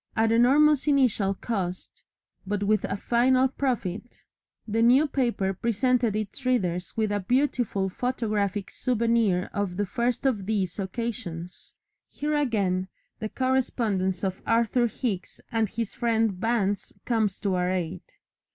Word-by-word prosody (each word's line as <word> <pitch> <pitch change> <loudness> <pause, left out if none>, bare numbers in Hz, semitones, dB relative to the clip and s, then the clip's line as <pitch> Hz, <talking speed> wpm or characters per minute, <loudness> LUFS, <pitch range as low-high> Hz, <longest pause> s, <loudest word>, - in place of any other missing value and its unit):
At 225 0 +2
enormous 275 +5 +4
initial 245 -9 +2
cost, 185 -5 -4 0.4
but 205 0 -1
with 210 0 +2
a - - -2
final 255 +4 +3
profit, 245 -5 -3 0.4
the 225 +1 0
New 250 +6 +6
Paper 235 -8 0
presented 235 +2 +1
its 215 +5 -4
readers 185 -9 -1
with 215 -2 +1
a 205 - 0
beautiful 240 -3 0
photographic 210 -3 -2
souvenir 230 -6 +1
of 200 -4 -2
the 205 - +1
first 240 +5 -1
of 210 -8 0
these 200 -4 -1
occasions. 190 -5 -5 0.3
Here 300 +1 -3
again 200 -10 +1 0.3
the 215 - -3
correspondence 220 -8 0
of 190 -1 -2
Arthur 235 +1 +3
Hicks 215 -5 -4
and 225 -2 +1
his 230 -1 -4
friend 225 -2 +1
Vance 205 0 -1
comes 220 -5 +1
to 200 -2 0
our 180 0 +1
aid. 180 -1 -2
220 Hz, 135 wpm, -26 LUFS, 195-245 Hz, 0.4 s, New